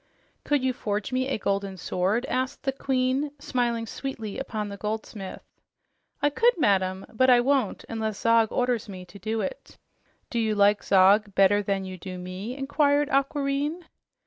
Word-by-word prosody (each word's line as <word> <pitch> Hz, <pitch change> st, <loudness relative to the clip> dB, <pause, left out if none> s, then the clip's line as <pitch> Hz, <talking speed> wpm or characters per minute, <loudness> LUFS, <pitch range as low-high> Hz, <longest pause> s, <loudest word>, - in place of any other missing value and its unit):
"Could 290 Hz, -3 st, +1 dB
you 260 Hz, -1 st, +1 dB
forge 210 Hz, 0 st, -3 dB
me 255 Hz, +1 st, 0 dB
a 275 Hz, -, -1 dB
golden 195 Hz, -1 st, -2 dB
sword?" 190 Hz, +8 st, 0 dB
asked 255 Hz, 0 st, -2 dB
the 270 Hz, -, +1 dB
Queen, 265 Hz, +1 st, 0 dB
smiling 240 Hz, -4 st, -1 dB
sweetly 225 Hz, -3 st, -5 dB
upon 215 Hz, -6 st, -3 dB
the 200 Hz, -, -6 dB
goldsmith. 210 Hz, -1 st, -5 dB, 0.8 s
"I 290 Hz, -, +4 dB
could, 470 Hz, -, +3 dB
madam, 190 Hz, -, +1 dB
but 260 Hz, +4 st, +3 dB
I 245 Hz, -1 st, +7 dB
won't 270 Hz, +1 st, 0 dB
unless 220 Hz, -2 st, -3 dB
Zog 230 Hz, -1 st, +4 dB
orders 245 Hz, -4 st, 0 dB
me 185 Hz, -2 st, -8 dB
to 180 Hz, +3 st, -14 dB
do 220 Hz, +1 st, -2 dB
it." -, -, -6 dB, 0.5 s
"Do 235 Hz, -, 0 dB
you 220 Hz, -1 st, +1 dB
like 205 Hz, 0 st, +4 dB
Zog 200 Hz, +2 st, +4 dB
better 195 Hz, +1 st, +5 dB
than 195 Hz, -1 st, -1 dB
you 185 Hz, -1 st, -7 dB
do 185 Hz, +1 st, -7 dB
me?" 185 Hz, +7 st, -6 dB
inquired 285 Hz, +1 st, +2 dB
Aquareine. 280 Hz, +4 st, 0 dB
225 Hz, 165 wpm, -26 LUFS, 200-270 Hz, 0.8 s, I